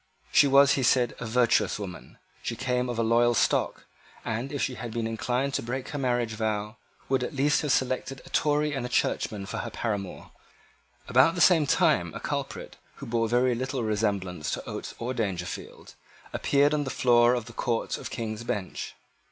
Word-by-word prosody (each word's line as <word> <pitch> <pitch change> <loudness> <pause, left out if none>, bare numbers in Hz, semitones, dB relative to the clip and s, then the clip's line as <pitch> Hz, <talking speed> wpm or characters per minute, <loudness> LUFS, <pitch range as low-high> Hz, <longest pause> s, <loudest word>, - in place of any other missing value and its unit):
She 145 - +6
was, 140 0 +6
he 140 - +2
said, 125 0 +3
a 115 - -5
virtuous 120 +1 +2
woman: 95 -4 -8 0.2
she - - -3
came 125 0 -1
of 120 - -3
a 115 - +1
loyal 120 +1 +3
stock, - - +1 0.4
and, 115 +6 -3
if 145 - -3
she 130 - -1
had 120 -2 -6
been 115 0 -2
inclined 125 +4 -1
to - - 0
break 130 +2 -4
her 145 - -4
marriage 120 -3 0
vow, 110 0 -2 0.3
would 130 -1 +1
at 140 - -5
least 145 +2 +2
have 150 - -1
selected 130 +1 0
a - - -13
Tory 150 0 +1
and 135 -2 -2
a 125 - -4
churchman 105 -4 -1
for - - -5
her 120 - -4
paramour. 105 -5 -4 0.8
About 130 +7 +4
the - - -3
same 160 -2 +5
time - - +2
a - - -4
culprit, - - -5 0.2
who - - -9
bore 115 -1 0
very 125 +1 +3
little 130 +1 -2
resemblance 100 -6 -1
to - - -4
Oates - - -6
or 125 +2 -3
Dangerfield, 95 -7 -5 0.4
appeared 145 +1 +2
on 150 -1 +1
the 135 - -4
floor 120 -1 +4
of 120 -3 -3
the 115 - -11
Court 115 -1 -2
of - - -6
King's 110 -1 -4
Bench. 100 -5 -4
120 Hz, 195 wpm, -27 LUFS, 110-135 Hz, 0.8 s, She